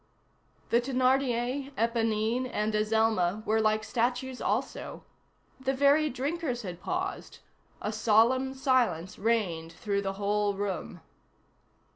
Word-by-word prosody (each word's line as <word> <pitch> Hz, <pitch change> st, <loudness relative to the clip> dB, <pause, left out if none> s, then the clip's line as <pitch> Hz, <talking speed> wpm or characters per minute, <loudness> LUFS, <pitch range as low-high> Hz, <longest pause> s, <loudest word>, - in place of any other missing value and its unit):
The 235 Hz, -, +4 dB
Thénardier, 260 Hz, +1 st, 0 dB
Éponine, 230 Hz, +2 st, 0 dB
and 210 Hz, +1 st, -1 dB
Azelma 215 Hz, -2 st, +1 dB
were 220 Hz, 0 st, +2 dB
like 215 Hz, 0 st, +2 dB
statues 250 Hz, +3 st, -1 dB
also; -, -, -2 dB, 0.6 s
the 265 Hz, +1 st, -1 dB
very 285 Hz, +3 st, +4 dB
drinkers 270 Hz, -1 st, -3 dB
had 180 Hz, -2 st, -7 dB
paused; 375 Hz, +2 st, -4 dB, 0.5 s
a 210 Hz, -, -2 dB
solemn 235 Hz, +5 st, +3 dB
silence 255 Hz, -, +1 dB
reigned 190 Hz, -8 st, 0 dB
through 200 Hz, -2 st, -2 dB
the 195 Hz, -1 st, -2 dB
whole 205 Hz, 0 st, 0 dB
room. 195 Hz, -4 st, -4 dB
230 Hz, 110 wpm, -29 LUFS, 210-260 Hz, 0.6 s, The